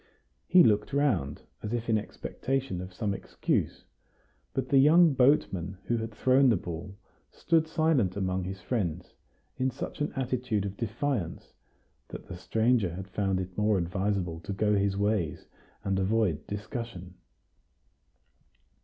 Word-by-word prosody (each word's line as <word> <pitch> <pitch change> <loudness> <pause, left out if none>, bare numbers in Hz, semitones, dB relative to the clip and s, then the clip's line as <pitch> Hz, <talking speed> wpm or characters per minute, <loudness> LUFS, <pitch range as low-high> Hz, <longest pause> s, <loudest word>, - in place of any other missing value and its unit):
He 180 -1 +7
looked 105 +4 +2
round, 110 - +1 0.2
as 105 - -4
if 120 -1 -2
in 115 - +3
expectation 130 -1 -3
of 90 +1 -7
some 100 +2 -2
excuse. - - -2 0.7
But 130 -1 -3
the 135 - +5
young 160 +3 +6
boatman 100 - +2
who 120 - 0
had 115 0 -3
thrown 130 +4 +4
the 110 - +4
ball 85 +3 -7 0.3
stood 165 -1 +1
silent 155 - +1
among 95 -1 -1
his 95 +1 -6
friends, 90 -6 -2 0.4
in 130 +1 +1
such 130 - -6
an 150 - 0
attitude 125 -6 -1
of 100 0 -4
defiance 115 - -3 0.5
that - - -9
the - - -8
stranger 110 -1 +1
had 95 +1 -7
found 95 -1 0
it 90 0 -5
more 105 -1 +2
advisable 90 -1 -1
to 100 - -5
go 105 +2 +1
his 100 -1 +1
ways 100 -6 0 0.4
and 95 -2 0
avoid 95 -6 +1
discussion. 105 -3 -6
105 Hz, 145 wpm, -29 LUFS, 95-125 Hz, 0.7 s, He